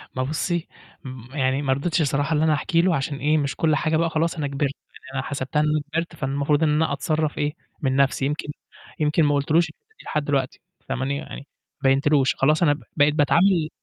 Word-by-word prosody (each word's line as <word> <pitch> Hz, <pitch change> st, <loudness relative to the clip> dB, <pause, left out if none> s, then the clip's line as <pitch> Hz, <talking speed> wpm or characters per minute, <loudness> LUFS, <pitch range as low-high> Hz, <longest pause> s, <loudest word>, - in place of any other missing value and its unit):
ثما 130 Hz, -, 0 dB
بُصّي 165 Hz, +4 st, -2 dB, 0.4 s
م 130 Hz, +1 st, -10 dB
يعني 135 Hz, 0 st, +1 dB
ما 135 Hz, -2 st, +1 dB
رضيتش 160 Hz, +5 st, 0 dB
الصراحة 145 Hz, +2 st, 0 dB
إن 150 Hz, -, +1 dB
أنا 160 Hz, -1 st, +3 dB
أحكي 165 Hz, +3 st, +1 dB
له 175 Hz, -2 st, +2 dB
عشان 140 Hz, 0 st, -2 dB
إيه، 150 Hz, +2 st, +2 dB
مش 140 Hz, -2 st, -1 dB
كل 155 Hz, -2 st, +2 dB
حاجة 155 Hz, +2 st, +1 dB
بقى 165 Hz, 0 st, +1 dB
خلاص 165 Hz, +2 st, 0 dB
أنا 150 Hz, -3 st, -2 dB
كِبرت، 140 Hz, 0 st, -1 dB, 0.2 s
يعني 130 Hz, -, -14 dB
أنا 135 Hz, -, -1 dB
حسبتها 140 Hz, +1 st, -2 dB
إن 150 Hz, -, +3 dB
أنا 155 Hz, 0 st, +1 dB
كبرت، 165 Hz, +1 st, -2 dB
فالمفروض 140 Hz, +2 st, 0 dB
إن 155 Hz, -, +3 dB
أنا 150 Hz, 0 st, +1 dB
أتصرّف 155 Hz, +1 st, -1 dB
إيه، 145 Hz, +1 st, -1 dB, 0.3 s
من 130 Hz, -2 st, 0 dB
نَفْسي 135 Hz, 0 st, +2 dB
يمكن 150 Hz, +2 st, -2 dB, 0.5 s
يمكن 150 Hz, +1 st, +2 dB
ما 145 Hz, -1 st, +3 dB
قُلتش 140 Hz, +1 st, -1 dB
له 165 Hz, -, +6 dB
الحتّة 175 Hz, -, -9 dB
دي -, -, -14 dB
لحد 150 Hz, -1 st, -2 dB
الوقتي 135 Hz, -2 st, -1 dB, 0.3 s
فاهماني؟ 140 Hz, +2 st, -1 dB
يعني 140 Hz, -, -9 dB, 0.4 s
بيّنتلوش 135 Hz, +1 st, +3 dB
خلاص 155 Hz, +5 st, +2 dB
أنا 145 Hz, -3 st, +5 dB
ب 150 Hz, -, -10 dB
بقيت 145 Hz, 0 st, +4 dB
باتعامل 165 Hz, +2 st, +3 dB
150 Hz, 215 wpm, -23 LUFS, 140-155 Hz, 0.5 s, له